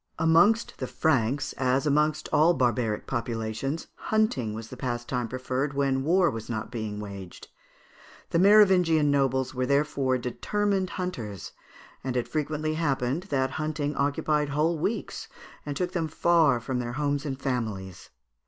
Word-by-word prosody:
Amongst 170 +8 +3
the 130 - -3
Franks, 130 0 0
as 130 +2 +1
amongst 150 +1 +1
all 165 +3 +5
barbaric 120 -4 0
populations, 115 +4 -3
hunting 175 - 0
was 115 0 -7
the - - -8
pastime 120 -1 -3
preferred 130 +3 -2
when 135 -1 +1
war 175 +2 +3
was 115 -1 -7
not 110 0 -4
being 110 -3 -4
waged. 100 -3 -9 0.8
The 165 - +2
Merovingian 180 -7 +5
nobles 130 -2 +1
were 130 0 -1
therefore 140 -2 +1
determined 195 +10 -1
hunters, 120 - -5 0.5
and 130 -1 -2
it 120 - -1
frequently 155 0 -2
happened 145 +1 -1
that 130 -3 0
hunting 150 -1 -2
occupied 145 +1 0
whole 155 +3 +1
weeks, 210 +8 -3 0.4
and 145 - -3
took 180 -1 -1
them 170 -4 -1
far 160 -4 +3
from 125 +2 -3
their 120 -1 -4
homes 145 +1 -1
and 135 -3 -4
families. 110 -9 -4
140 Hz, 145 wpm, -27 LUFS, 125-160 Hz, 0.8 s, all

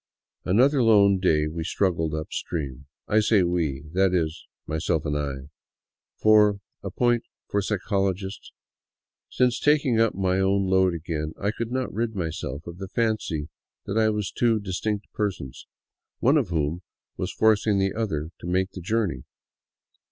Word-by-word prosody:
Another 130 +8 +4
lone 100 -4 +5
day 80 -5 +2
we 80 +1 -4
struggled 85 -2 0
up 80 0 -5
stream. 70 -4 -4 0.2
I 110 - +3
say 105 -2 +3
we, 80 -6 -1
— - - -16
that 95 0 +3
is, 80 -1 -2 0.2
my 80 +1 -3
self 80 0 0
and 75 -1 -1
I; 70 -1 -4 0.7
for 105 -2 +5
— 135 - -57
a - - -5
point 120 -1 +2 0.3
for 100 - 0
psychologists 100 -1 -2 0.4
— - - -68
since 125 -2 +3
taking 140 -6 +3
up 115 -1 +3
my 95 0 +1
own 95 +1 +2
load 95 -2 +3
again 80 -1 -4
I 100 +1 0
could 115 +1 -5
not 130 0 -2
rid 110 +1 -2
myself 80 -5 -4
of 85 +1 -9
the 95 - -5
fancy 110 -9 -1 0.4
that 105 +3 -1
I 110 -1 +4
was 105 -2 -2
two 115 -2 +2
dis 95 -2 -4
tinct 105 -2 -2
persons, 95 -11 -4 0.5
one 135 +5 +3
of 135 - +2
whom 80 +1 -1 0.3
was - - -3
forcing 110 -1 +3
the 95 0 +1
other 85 -9 -2
to - - -8
make 95 +2 0
the 95 - -8
journey. 100 - -1
95 Hz, 170 wpm, -25 LUFS, 80-110 Hz, 0.7 s, lone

